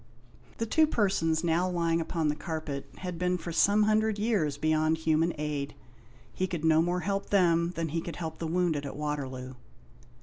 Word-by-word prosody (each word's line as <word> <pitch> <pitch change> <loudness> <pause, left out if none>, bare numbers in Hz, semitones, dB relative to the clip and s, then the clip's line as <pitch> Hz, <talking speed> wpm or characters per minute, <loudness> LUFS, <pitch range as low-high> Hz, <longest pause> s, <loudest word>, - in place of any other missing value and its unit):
The 230 - -1
two 315 +7 +4
persons 190 - +1
now 170 +2 +1
lying 170 -2 +1
upon 160 -1 -1
the 150 - +1
carpet 155 -3 -5
had 180 -3 -5
been 180 0 +1
for 170 0 -6
some 205 +5 +4
hundred 215 0 +2
years 200 -10 0
beyond 155 +1 +2
human 160 +1 +2
aid. 145 -1 -3 0.6
He 185 - -1
could 170 -4 -3
no 160 0 +5
more 175 +2 0
help 195 +1 -2
them 170 -3 +3
than 165 -1 -2
he 165 +2 -2
could 170 - -6
help 160 -2 -5
the 165 - -3
wounded 165 -3 0
at 140 -2 -6
Waterloo. 135 -4 -4
165 Hz, 180 wpm, -29 LUFS, 155-180 Hz, 0.6 s, no